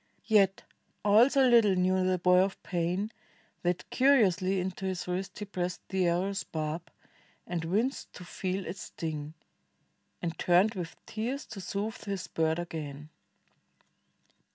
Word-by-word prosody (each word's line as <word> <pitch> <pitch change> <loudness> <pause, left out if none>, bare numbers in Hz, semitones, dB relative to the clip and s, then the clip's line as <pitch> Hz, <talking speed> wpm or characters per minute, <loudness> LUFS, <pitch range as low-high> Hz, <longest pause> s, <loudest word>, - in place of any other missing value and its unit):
Yet 195 -3 +3 0.4
all 215 +5 +7
so 270 -2 +4
little 230 -5 +5
knew 185 +1 +2
the 185 0 +2
boy 180 +1 +5
of 190 +1 0
pain 180 +4 -1 0.5
That 175 0 -1
curiously 195 -9 +4
into 190 +1 -3
his 185 -2 -3
wrist 185 +1 -3
he 210 - -5
pressed 180 -2 -3
31 190 -1 0
INDIA - - +4
The 170 -1 +3
arrow's 200 0 -2
barb, 155 +2 -4 0.5
and 170 -2 -3
winced 220 +11 -1
to 180 - -10
feel 185 +2 -3
it 175 +4 -5
sting. 155 -4 -5 0.8
And 170 -2 -3
turned 185 +5 +4
with 175 -4 -5
tears 245 +6 -3
to 205 -4 -8
soothe 215 +5 -4
his 195 -3 -3
bird 160 0 0
again. 155 -4 -6
185 Hz, 150 wpm, -30 LUFS, 175-205 Hz, 0.8 s, all